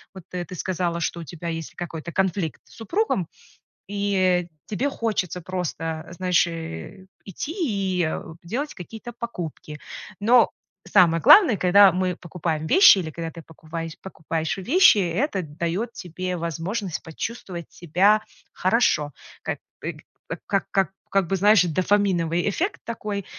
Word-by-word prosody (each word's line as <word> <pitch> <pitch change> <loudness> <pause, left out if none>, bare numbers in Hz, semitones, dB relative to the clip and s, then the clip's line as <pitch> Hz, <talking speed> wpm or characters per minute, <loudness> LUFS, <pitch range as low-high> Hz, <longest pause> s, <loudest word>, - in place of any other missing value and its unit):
вот, 185 - -9
э, 180 -1 -3
ты 180 - -9
сказала, 175 -1 -2
что 170 +1 -2
у - - -6
тебя 170 +3 -8
есть 165 -1 -5
какой-то 170 -1 -6
конфликт 185 -5 -1
с - - -20
супругом 225 - -1 0.6
и 190 -3 +1 0.2
тебе 260 +7 -1
хочется 185 -8 -2
просто, 165 -3 -4
знаешь, 180 0 +2
э, 165 - -7 0.2
идти 245 - -5
и, 195 - 0
э, - - -3 0.2
делать 265 - -3
какие-то 220 +6 -9
покупки. 165 -9 -6 0.4
Но 235 +3 +5 0.4
самое 165 -2 +4
главное, 335 - +8
когда 195 +2 +7
мы 180 -1 -1
покупаем 160 -3 -3
вещи 375 - +8
или 160 -4 -3
когда 165 +1 -5
ты 165 - -10
покупае 160 +1 -7
покупаешь 165 0 -3
вещи, 275 - +6
это 195 - 0
даёт 170 +9 -3
тебе 180 +1 -4
возможность 170 +3 -3
почувствовать 175 0 -6
себя 190 +6 +3 0.3
хорошо. 180 - +2 0.3
Как, - - -3 0.2
э, - - -3
к - - -16 0.4
как 195 -1 0
как 195 -1 +2 0.2
как 195 -3 +2
бы, 195 - 0
знаешь, 205 -1 +5
дофаминовый 175 -1 +1
эффект 370 - -2
такой. 210 -4 -4
180 Hz, 140 wpm, -24 LUFS, 165-205 Hz, 0.6 s, главное